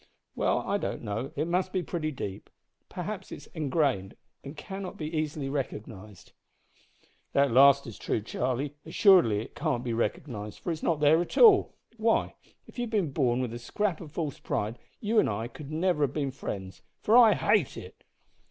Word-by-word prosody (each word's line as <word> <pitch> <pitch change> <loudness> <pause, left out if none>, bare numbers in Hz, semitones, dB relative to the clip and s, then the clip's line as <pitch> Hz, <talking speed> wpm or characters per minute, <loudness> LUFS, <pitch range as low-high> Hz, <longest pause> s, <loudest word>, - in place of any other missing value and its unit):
"Well, - - +1
I - - +1
don't - - -4
know. 110 +6 -3
It 150 +3 -1
must 180 +2 0
be 185 -1 -1
pretty 160 -2 -3
deep. 100 -9 -6 0.4
Perhaps - - -6
it - - -4
is - - -14
engrained, 135 - 0 0.3
and 140 +2 -9
cannot 195 +3 -7
be 155 +1 -5
easily 155 -2 -2
recognised." 105 -7 -6 1.0
"That 140 -2 +3
last 140 +3 +6
is 115 - -9
true, - - -1
Charlie. 130 +6 -2
Assuredly 160 - +4
it 115 - -10
can't 145 -6 -1
be 120 -2 -2
recognised, 115 -2 -3
for 175 - -4
it's 160 - -4
not 160 -3 0
there 155 +3 +5
at 175 - -5
all. 435 -5 +6 0.2
Why, 225 0 +1 0.3
if - - -12
you - - 0
had - - -7
been 200 -9 0
born 130 -3 +1
with 120 -2 -4
a 120 - -6
scrap 180 - -2
of 155 -4 -9
false 155 -3 -4
pride 110 +3 -3 0.2
you 215 +1 +2
and - - +3
I 110 +2 -3
could 140 +3 -10
never 165 0 0
have 135 - -6
been 140 -3 -1
friends 95 -7 -7 0.2
for 220 - +4
I 230 -4 +8
hate 205 -8 +1
it!" - - -11
145 Hz, 190 wpm, -28 LUFS, 120-175 Hz, 1.0 s, I